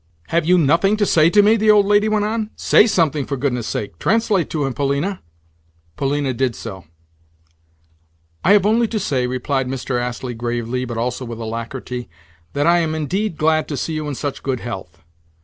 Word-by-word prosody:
"Have 170 -1 +1
you 180 +1 +5
nothing 170 +7 +3
to 210 - +2
say 160 -3 +4
to 205 +3 +5
me?" 215 +2 +5
the 215 0 +2
old 210 -1 +6
lady 205 +1 +3
went 210 -1 +1
on. 215 0 -2
"Say 215 - +4
something, 155 -8 +1
for 140 +1 -4
goodness' 125 -4 -1
sake! 100 -6 -4
Translate 215 -5 +1
to 150 -3 -1
him, 135 - -2
Polina." 140 - -1 0.7
Polina 140 -1 -1
did 125 -1 -1
so. 95 -6 -8 1.6
"I 195 - +5
have 205 -2 +4
only 225 +2 +3
to 220 -1 -2
say," 130 -9 0
replied 130 +1 -1
Mr. 125 -1 -2
Astley 125 +1 -4
gravely, 120 +1 -3
but 120 -2 -5
also 125 +2 -2
with 120 -2 -6
alacrity, 115 +1 -5 0.4
"that 145 +1 0
I 170 +1 +5
am 160 -2 -1
indeed 170 +4 -2
glad 155 0 +2
to 145 - -4
see 160 - -3
you 155 -1 -3
in 145 - -3
such 145 +1 -4
good 130 -3 -2
health." 90 -8 -8
145 Hz, 190 wpm, -20 LUFS, 125-190 Hz, 1.6 s, old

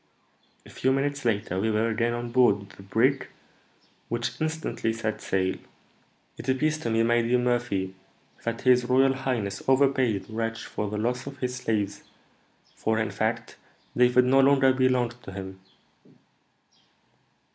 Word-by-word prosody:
A - - -14
few 130 - 0
minutes 140 0 -1
later 105 -5 0
we 110 +3 0
were 110 +1 +1
again 115 +1 0
on 120 0 -4
board 100 -6 +3
the - - -14
brig, 125 +8 +1 0.8
which 120 +5 -3
instantly 155 -7 -2
set 110 -1 -3
sail." 95 -1 0 0.8
"It 130 - -6
appears 150 +4 +1
to 120 - -3
me, 115 0 +2
my 120 +1 +3
dear 120 +2 +2
Murphy, 120 -6 -1 0.5
that 115 0 -3
his 125 -1 +4
royal 130 +2 +4
highness 120 -7 -2
overpaid 130 -6 +3
this - - -21
wretch 115 +1 -3
for 105 - -4
the 105 - -4
loss 125 +5 -2
of 140 0 -7
his 125 -1 -3
slaves; 105 -4 -2 0.7
for, 110 0 -1
in 110 -1 -1
fact, 110 +3 -2 0.4
David 125 0 +4
no 135 +2 +4
longer 135 -1 +5
belonged 125 -2 +1
to 95 - -10
him." 95 -1 -7
120 Hz, 150 wpm, -26 LUFS, 110-130 Hz, 0.8 s, longer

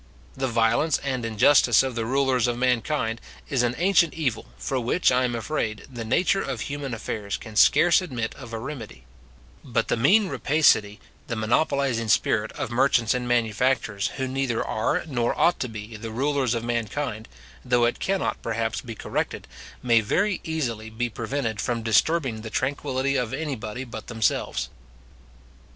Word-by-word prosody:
The 135 0 -1
violence 115 +6 +2
and 130 -3 -2
injustice 120 +2 +5
of 130 -1 -2
the 115 -1 -3
rulers 130 -2 +2
of 120 -1 -1
mankind 125 -1 0 0.3
is 135 -3 +2
an 120 0 0
ancient 175 -3 +3
evil, 135 -9 -2
for 95 - -2
which, 125 +8 +2
I 125 0 +3
am 120 -1 -2
afraid, 110 -3 -3
the 120 -4 -7
nature 180 - +2
of - - -4
human 140 -3 -4
affairs 105 -2 -4
can 110 -2 -11
scarce 175 - +5
admit 125 -10 -4
of 120 -4 -11
a 115 - -3
remedy: 110 - -8 0.6
but 115 -4 -1
the - - +2
mean 195 - +4
rapacity, 115 - +2 0.3
the 115 - -3
monopolizing 120 +1 +1
spirit, 110 0 +2
of - - -4
merchants 120 -2 +3
and 125 -1 -2
manufacturers, 115 -2 +1
who 130 -1 -1
neither 130 -3 -1
are, 150 +10 0
nor 120 -6 -1
ought 175 - +3
to 125 - -2
be, 110 0 -8
the 115 +1 -6
rulers 130 +1 0
of 115 - -3
mankind, 115 0 -3 0.4
though 125 -1 +3
it 120 - -1
cannot, 195 0 -1
perhaps, 115 0 -2
be 115 -3 -8
corrected, - - -3 0.4
may 115 -2 +4
very 190 - 0
easily 120 -9 -3
be 120 +2 -2
prevented 115 -2 -3
from 120 -2 -2
disturbing 115 +1 +2
the 110 - -7
tranquillity 135 +2 -1
of 125 0 -1
anybody 130 -6 -4
but 115 -4 -9
themselves. 115 -3 -1
120 Hz, 165 wpm, -25 LUFS, 115-140 Hz, 0.6 s, injustice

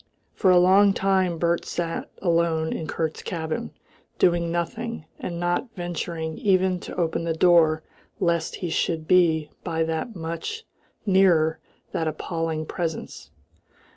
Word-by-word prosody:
For 190 - +2
a 180 - +7
long 195 +3 +6
time 190 -3 +1
Bert 170 +1 +1
sat 170 -1 -3
alone 165 -2 +1
in 160 - -4
Kurt's 160 -1 -2
cabin, 160 - -3 0.5
doing 170 -1 +2
nothing 225 +3 -3
and 170 -2 -4
not 175 +8 0
venturing 170 -3 -4
even 185 -2 +2
to - - -8
open 170 -1 0
the 165 -1 -1
door 160 -2 +4 0.4
lest 170 -4 0
he 170 - -3
should 160 -1 -1
be 160 -4 +3
by 165 -2 0
that 160 +8 -3
much 170 - -5 0.4
nearer 180 -5 +4 0.3
that 160 - -1
appalling 160 0 -2
presence. 160 - -5
170 Hz, 135 wpm, -25 LUFS, 160-180 Hz, 0.5 s, a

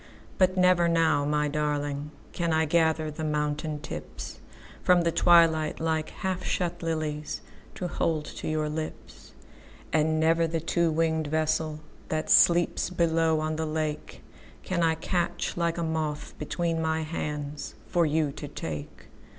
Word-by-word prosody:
But 185 0 +3
never 180 -1 +4
now, 160 -4 +3
my 150 0 +1
darlingCan 150 +2 -2
I 160 0 +3
gather 160 -1 +2
the 155 +1 -6
mountain 150 0 -1
tipsFrom 150 - -3
the 170 - +2
twilight 165 -3 +4
like 160 -1 -1
half 185 -1 -3
shut 175 -3 -1
liliesTo 155 +2 -4
hold 160 -2 -1
to - - -7
your 155 -1 0
lips. 155 +1 -7 0.6
And 155 0 +2
never 165 +1 +3
the 165 0 -1
two 170 +1 +1
winged 160 -1 0
vesselThat 155 0 -2
sleeps 175 0 +5
below 165 -2 +2
on 155 0 -2
the 160 0 -1
lakeCan 155 +3 -5
I 165 -1 +3
catch 175 +2 -2
like 170 -1 0
a 170 - -1
moth 155 -2 -2
between 165 +2 -1
my 160 0 0
handsFor 150 +2 -2
you 150 -1 +1
to 145 +1 -7
take. 75 - -7
160 Hz, 130 wpm, -27 LUFS, 150-165 Hz, 0.6 s, sleeps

